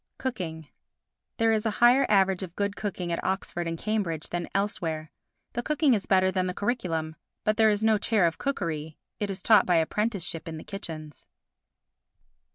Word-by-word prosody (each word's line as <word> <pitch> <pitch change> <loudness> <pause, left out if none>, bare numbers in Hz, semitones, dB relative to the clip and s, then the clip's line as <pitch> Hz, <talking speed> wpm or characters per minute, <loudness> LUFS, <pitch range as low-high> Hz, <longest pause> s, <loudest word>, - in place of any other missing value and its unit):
Cooking 165 - -4 0.7
There 225 -1 +3
is 215 -1 +1
a 225 - +1
higher 245 +3 +6
average 195 -2 +3
of 180 -2 -7
good 200 0 -1
cooking 185 -4 -3
at 170 - -2
Oxford 185 -2 -2
and 165 0 -3
Cambridge 190 -6 -2
than 175 0 -3
elsewhere. 165 -6 -2 0.4
The 240 - -1
cooking 300 0 +2
is 205 -4 -1
better 185 -1 +4
than 185 0 0
the 180 - -3
curriculum. 165 -8 -2 0.3
But 215 0 +1
there 220 -1 +6
is 210 0 0
no 220 -1 +4
Chair 215 -4 +3
of 165 -1 0
Cookery, 160 - -3 0.2
it 205 - -1
is 195 - -5
taught 215 -4 +6
by 180 - +4
apprenticeship 180 0 0
in 160 -1 -5
the - - -8
kitchens. 155 -7 -8
190 Hz, 175 wpm, -27 LUFS, 165-215 Hz, 0.7 s, higher